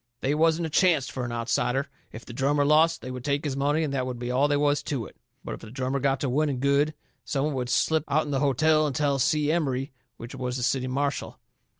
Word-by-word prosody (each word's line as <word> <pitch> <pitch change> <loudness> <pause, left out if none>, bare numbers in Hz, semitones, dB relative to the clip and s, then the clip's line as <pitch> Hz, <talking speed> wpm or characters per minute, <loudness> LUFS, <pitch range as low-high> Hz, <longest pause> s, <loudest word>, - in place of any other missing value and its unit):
They 135 - +1
wasn't 165 +2 +2
a 160 - -5
chancet 160 -5 +3
fur 130 -2 -4
an 120 - -5
outsider. 120 +3 0 0.2
If 110 - -10
the 120 - -9
drummer 140 +3 +1
lost, 160 +3 +3
they 130 - -5
would 125 -1 -7
take 145 +2 -1
his 140 -3 -2
money 145 +3 +1
and 145 -3 -2
that 130 -2 -1
would 125 -1 -4
be 120 +1 -4
all 135 +3 +3
they 145 0 +1
was 145 0 +2
to 130 -7 -3
it. - - -13 0.3
But - - -4
if - - -8
the - - -10
drummer 130 +3 -2
got 135 0 +1
to 140 - 0
winning 140 0 0
good, 140 +3 +2 0.3
some 140 0 -1
one 150 - -1
would 125 -2 -3
slip 155 +5 +1
out'n 150 +1 0
the 135 - +1
hotel 155 +3 +3
and 140 - -4
tell 140 -2 +1
Si 150 +1 +2
Emery, 140 -5 -1 0.3
which 115 +1 -9
was 125 -1 -3
the 125 - -3
city 130 +1 0
marshal. 140 +2 -2
140 Hz, 250 wpm, -26 LUFS, 130-150 Hz, 0.3 s, chancet